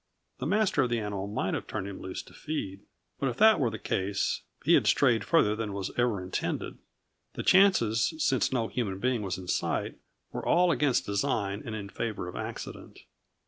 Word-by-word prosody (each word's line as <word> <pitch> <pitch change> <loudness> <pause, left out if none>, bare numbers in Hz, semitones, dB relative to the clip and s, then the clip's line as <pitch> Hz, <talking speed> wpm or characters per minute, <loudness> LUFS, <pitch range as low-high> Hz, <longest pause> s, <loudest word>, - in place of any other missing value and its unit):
The 130 - -2
master 195 -4 +2
of 125 - +1
the 120 - +1
animal 100 -2 -3
might 105 - -2
have - - -3
turned 95 - -4
him 100 - -7
loose 95 - -5
to - - -17
feed, 100 -11 -4 0.4
but 135 - +1
if 120 - -5
that 220 +1 +6
were 125 -5 +2
the 110 - -5
case, 100 -1 -1 0.2
he - - +5
had - - +4
strayed 120 -6 +4
farther 105 -4 +3
than 110 -2 -3
was 100 -1 -3
ever 120 -6 +1
intended; 90 - -3 0.6
the - - -4
chances, 165 - +4
since 135 -4 +1
no 120 -4 0
human 105 -7 -2
being 125 +2 0
was 95 -3 -3
in 95 -1 -9
sight, - - -1 0.3
were - - -5
all 180 0 +4
against 145 -6 +2
design 100 0 -1
and 110 - -5
in 100 -2 -5
favor 105 -2 -4
of 90 - -7
accident. - - -7
110 Hz, 195 wpm, -29 LUFS, 100-135 Hz, 0.6 s, that